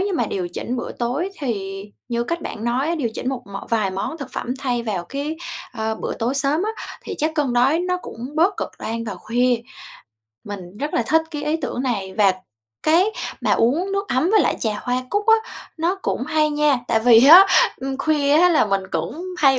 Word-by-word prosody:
như 395 0 0
mà - - 0
điều 180 -2 -3
chỉnh 235 +8 -4
bữa 240 - -4
tối 260 +10 -2
thì 195 -7 -3 0.3
như 235 0 -1
cách 335 +4 -3
bạn 215 - -6
nói 250 +4 0
á, 340 - +1
điều 270 -8 -1
chỉnh 255 - -3
một 265 -2 -3
mọn 195 0 -7
vài 215 -4 +1
món 195 - -4
thực 260 -3 -8
phẩm 250 - -3
thay 245 -3 -1
vào 200 -6 -3
cái, 285 - -4 0.4
ờ, 220 -2 -2
bữa - - -4
tối 240 +4 -1
sớm 280 +5 +1
á, 435 - -1 0.3
thì - - -5
chắc 310 +2 +1
cơn 290 -5 0
đói 255 +6 +3
nó 360 +1 0
cũng - - -9 0.2
bớt 375 +5 +3
cực - - -3
đoan 230 +1 -4
vào 210 -3 -5
khuya. 245 +2 +1 0.9
Mình 200 -1 -8
rất 295 +3 -3
là - - +2
thích 320 +1 +3
cái 295 -2 -5
ý 305 +2 +1
tưởng 270 -4 -4
này 200 -7 -2
và 195 -2 +5 0.5
cái 330 +4 +5 0.4
mà - - 0
uống 325 +12 +2
nước 395 0 -2
ấm 260 +8 +1
với 435 - +5
lại - - +1
trà 215 -2 -1
hoa 250 0 -1
cúc 410 0 0
á 445 - +7 0.4
nó 340 +3 +1
cũng - - -1
hay 305 +1 +1
nha 295 -2 +2
tại 225 -1 +3
vì 235 +2 +7
á, 360 +6 +10 0.3
ừm, 270 +1 -4
khuya 290 -2 +2
á 360 - +6
là 335 - +4
mình 195 -2 0
cũng 170 - -3 0.2
hay 270 -4 +5
260 Hz, 225 wpm, -21 LUFS, 230-315 Hz, 0.9 s, á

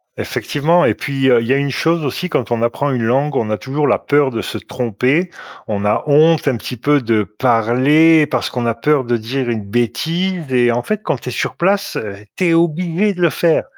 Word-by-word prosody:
Effectivement 165 +5 0
et - - +2
puis, 135 -2 -1
heu, 120 -2 +4
il 115 - -4
y 130 - +3
a - - +2
une 140 -1 -1
chose 165 +3 0
aussi 180 +7 -3
quand 120 -6 -2
on 115 - 0
apprend 140 +4 -1
une 125 -3 -1
langue, 135 +5 0
on 110 -4 -1
a 105 - 0
toujours 145 +2 -2
la - - +2
peur 145 -2 +1
de 115 - -3
se - - -5
tromper. 130 - -1 0.4
On 105 -1 -3
a 105 - +1
honte 155 +2 +4
un 135 - +2
petit 125 - -7
peu 145 +4 +2
de 110 -2 +1
parler 130 - +3
parce 130 -4 -2
qu'on 120 -1 -3
a 115 - +1
peur 140 +3 +1
de 120 0 -1
dire 120 +3 -3
une 110 -3 -2
bêtise 155 - -2
et 120 -1 +3
en 120 +1 -1
fait, 215 - -3
quand 135 - -2
tu 125 - -7
es - - -5
sur - - -3
place, 200 +3 0
heu, 100 -2 -5 0.2
tu 185 - -1
es 170 - +3
obligé 170 +4 +1
de 180 - -7
le 170 - +4
faire. 165 0 +1
135 Hz, 235 wpm, -17 LUFS, 120-160 Hz, 0.4 s, heu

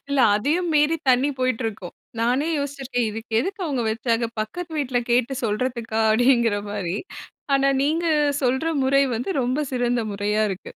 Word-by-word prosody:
இல்ல, 280 0 0 0.2
அதையும் 310 +12 0
மீறி 300 +2 +3
தண்ணி 255 +3 +4
போய்ட்ருக்கும். 225 -7 -2 0.3
நானே 250 +6 +1
யோசிச்சிருக்கேன், 270 -4 -2
"இதுக்கு 225 +2 -8
எதுக்கு 395 - -4
அவுங்க 275 -6 -1
வச்சாங்க? 230 +1 0
பக்கத்து 330 +11 -5
வீட்ல 260 -4 0
கேட்டு 245 +2 +2
சொல்றதுக்கா" 225 0 -2
அப்படீங்கிறமாரி. 210 -6 +1 0.6
ஆனா 275 0 +3
நீங்க 320 +4 0 0.4
சொல்ற 260 +5 +1 0.2
முறை 275 +1 +4
வந்து 245 - -3
ரொம்ப 255 +4 0
சிறந்த 245 -1 +1
முறையா 210 +2 0
இருக்கு. 190 0 -7
245 Hz, 140 wpm, -23 LUFS, 225-275 Hz, 0.6 s, தண்ணி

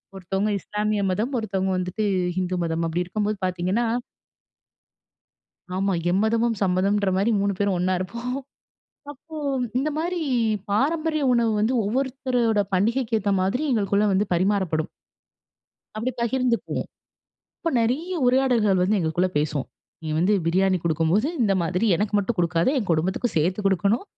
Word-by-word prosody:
ஒருத்தவுங்க 195 +3 -1
இஸ்லாமிய 210 -1 -1
மதம், 220 +8 -1
ஒருத்தவங்க 190 -3 -1
வந்துட்டு 185 +4 -2 0.3
ஹிந்து 185 0 -1
மதம் 165 0 -1
அப்பிடி 170 +2 -1
இருக்கும்போது 210 +3 -2
பார்த்தீங்கன்னா 185 +6 0 1.9
ஆமா. 195 +1 +1 0.2
எம்மதமும் 225 +4 +1
சம்மதம்ன்றமாரி 195 +2 +2
3 200 0 +1
பேரும் 200 -1 +1
ஒன்னா 185 +1 +1
இருப்போம் 235 +7 -4 0.8
அப்போ 305 +3 -13 0.4
இந்தமாரி 310 +5 -1 0.5
பாரம்பரிய 310 +7 +1
உணவு 235 -2 +2
வந்து 220 +4 +1
ஒவ்வொருத்தரோட 250 -1 0
பண்டிகைக்கு 225 +4 +1
ஏத்த 200 0 -1
மாதிரி 220 +11 0
எங்களுக்குள்ள 205 -2 +2
வந்து 200 +2 +2
பரிமாறப்படும். 180 -3 0 1.1
அப்படி 230 +4 -2
பகிர்ந்துக்குவோம். 245 0 -1 0.7
இப்போ 330 - -1
நிறைய 290 +11 -1
உரையாடல்கள் 245 -7 +3
வந்து 200 +4 +2
எங்களுக்குள்ள 175 +2 +1
பேசுவோம். 150 -3 -2 0.3
நீ 160 - -5
வந்து 180 +5 +3
பிரியாணி 185 +2 +2
குடுக்கும்போது, 165 - +1
இந்த 200 -3 +3
மாதிரி 180 +6 0
எனக்கு 210 +4 -1
மட்டும் 205 +2 -1
குடுக்காத 170 +1 +2
என் 210 -7 -3
குடும்பத்துக்கும் 185 +8 0
சேர்த்து 180 +6 +1
குடுக்கணும். 200 - +1
205 Hz, 125 wpm, -24 LUFS, 185-235 Hz, 1.9 s, உரையாடல்கள்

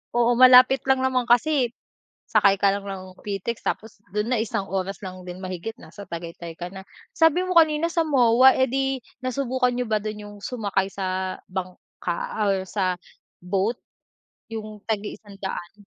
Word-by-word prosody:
Oo, 240 0 +3
malapit 255 +1 +8
lang 265 -1 +3
naman 255 -2 +1
kasi, 255 +2 +3 0.6
sakay 195 -1 +4
ka 200 -1 +3
lang 200 - -4
ng 185 -2 -7
pitex. 205 +3 -4
Tapos 220 -1 -4
dun 210 +3 -1
na, 230 - +1
isang 200 -3 -2
oras 195 +1 -3
lang 185 -1 -7
din 180 0 -8
mahigit 185 +4 -5
nasa 205 - -12
tagaytay 170 0 -7
ka 175 - -4
na. 190 - -8 0.3
Sabi 330 +3 +3
mo 365 - -1
kanina 320 -1 +5
sa 335 0 +1
MOA, 260 -4 +5
eh, 260 - +4
di 270 +1 0 0.2
nasubukan 255 -1 0
niyo 245 0 -2
ba 215 -2 0
dun 215 0 -4
yung 205 0 -11
sumakay 200 -5 -1
sa 185 -1 -3
bangka 180 -1 -5 0.3
or 190 -1 -1
sa 185 -2 -1 0.4
boat, 195 +6 -1 0.7
yung 215 -1 -7
tag-iisang-daan. 205 -2 -5
210 Hz, 160 wpm, -24 LUFS, 190-255 Hz, 0.7 s, malapit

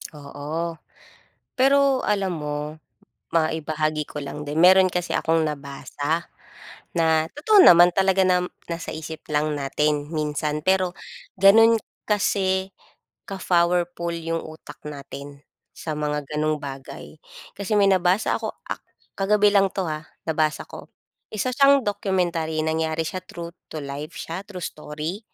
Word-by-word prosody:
Oo. 150 +3 -5 0.8
Pero 275 0 +4
alam 195 -4 0
mo 150 +1 -4 0.5
maibahagi 155 -1 0
ko - - -7
lang 140 - -6
din, 145 - -4
meron 185 +2 +7
kasi 180 0 -2
akong 165 0 +2
nabasa 145 +2 -3 0.7
na 160 -1 +3
totoo 390 - +4
naman 175 - +8
talaga 190 +1 +3
nam 180 -1 +2 0.2
nasa 170 0 -6
isip 160 0 -7
lang 150 0 0
natin 145 +1 0
minsan, 150 -1 -2
pero 185 -1 +2 0.4
ganun 225 +4 +7 0.3
kasi 190 -2 +1 0.6
ka-powerful 175 -2 +1
yung 165 0 -2
utak 155 0 -11
natin 140 0 -9 0.3
sa 155 - -4
mga 150 -1 -2
gano'ng 155 +1 0
bagay. 135 -2 -8 0.4
Kasi 205 +1 -1
may 200 - +5
nabasa 185 +2 +2
ako - - -3 0.2
ak - - -4 0.4
kagabi 205 +1 +4
lang 195 -1 +5
'to 190 - -2
ha, 155 -1 -5 0.2
nabasa 155 -1 0
ko. - - -11 0.4
Isa 220 +4 -2
siyang 275 0 +5
documentary 175 -6 -1
nangyari 160 0 0
siya 185 - -4
true 170 -2 -8 0.2
to 155 - -5
life 145 +4 -7
siya, 165 +3 -5
true 180 -4 -6
story. 155 +5 -5
165 Hz, 130 wpm, -24 LUFS, 150-190 Hz, 0.8 s, naman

